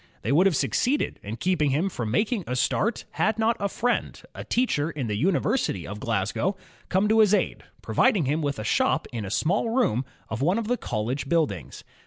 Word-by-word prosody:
They - - -1
would 175 +7 +5
have 185 - +1
succeeded 260 - 0
in 105 +2 -5
keeping 155 0 +1
him 150 +8 +1
from 120 - -3
making 210 - 0
a 125 - -2
start, 215 - 0
had 215 0 0
not 225 +1 +2
a 200 - -1
friend, 245 +5 -1
a - - -7
teacher 165 - 0
in 150 -6 -4
the 105 -2 -2
University 175 - 0
of 105 +1 -7
Glasgow, 105 - -1 0.3
come 190 +3 +2
to 220 +1 +3
his 210 -1 +6
aid, - - -1 0.2
providing 180 -8 +2
him 150 +5 0
with 145 -2 -1
a 110 - -4
shop - - +1
in 110 -3 -3
a - - -5
small 165 - +1
room 225 - +1 0.2
of 110 +3 -4
one 175 +8 +2
of 230 -2 -2
the 245 - +2
college 125 - -3
buildings. 100 - -1
165 Hz, 205 wpm, -25 LUFS, -, 0.3 s, his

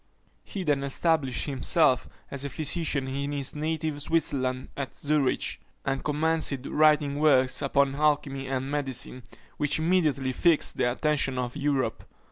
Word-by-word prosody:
He 195 - -6
then 145 -4 +1
established 140 -2 0
himself 135 -1 +2 0.2
as 140 -1 -5
a 140 - -3
physician 150 -1 -2
in 140 +2 -3
his 140 -2 0
native 155 -1 -2
Switzerland 135 -5 -1
at 140 -2 -5
Zurich, 145 -2 0 0.2
and 135 0 -1
commenced 150 -3 0
writing 150 -2 +3
works 130 -4 +3
upon 140 0 +2
alchymy 140 -2 0
and 135 +1 -3
medicine, 135 -3 -1 0.4
which 150 - +3
immediately 155 -6 +1
fixed 165 +4 +2
the 125 - +2
attention 140 -1 0
of 125 -1 -3
Europe. 140 -2 -1
140 Hz, 135 wpm, -27 LUFS, 135-150 Hz, 0.4 s, writing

